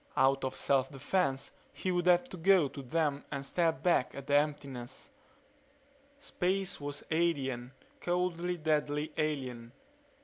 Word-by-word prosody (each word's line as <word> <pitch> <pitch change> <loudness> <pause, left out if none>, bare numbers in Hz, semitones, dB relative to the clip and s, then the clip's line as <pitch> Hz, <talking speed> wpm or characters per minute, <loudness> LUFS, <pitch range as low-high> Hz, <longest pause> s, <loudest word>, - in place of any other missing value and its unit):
Out 135 +1 +4
of 130 - -2
self 135 -1 +2
defense 135 0 0 0.2
he 185 - -2
would 175 0 0
have 180 +6 +5
to 185 - -8
go 180 -2 +5
to 140 - -8
them 145 +1 0
and 140 -1 -4
stare 170 +2 +2
back 160 -5 +1
at 140 - -7
the 140 - -1
emptiness. 140 -4 -1 1.1
Space 190 - -1
was 145 0 -3
alien; 135 -7 0 0.3
coldly, 175 0 -1
deadly, 150 -1 0
alien. 130 -6 -2
150 Hz, 135 wpm, -32 LUFS, 135-175 Hz, 1.1 s, have